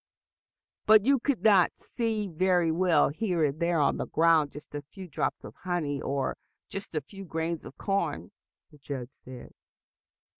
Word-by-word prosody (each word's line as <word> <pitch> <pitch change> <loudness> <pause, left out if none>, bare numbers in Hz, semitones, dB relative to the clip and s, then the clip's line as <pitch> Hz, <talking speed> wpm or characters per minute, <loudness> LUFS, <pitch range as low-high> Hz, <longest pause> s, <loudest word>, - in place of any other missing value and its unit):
"But 215 -1 +7
you 275 0 +4
could 275 +1 -1
not 200 -5 +5
see 220 -3 -3
very 175 -1 +2
well 175 +1 +3
here 175 0 0
and 145 +2 -2
there 170 -1 +1
on 140 - +2
the - - -3
ground 160 -3 +3
just 150 +1 -12
a 145 - -4
few 185 +6 -11
drops 160 - -2
of - - -9
honey 165 -6 -2
or 135 -1 -2 0.3
just 195 -4 -7
a 155 - 0
few 195 +8 -11
grains 165 -1 -3
of - - -11
corn?" 200 -1 -2 0.4
the 150 - -18
judge 135 -3 -6
said. 125 -1 -11
170 Hz, 165 wpm, -28 LUFS, 150-195 Hz, 0.4 s, But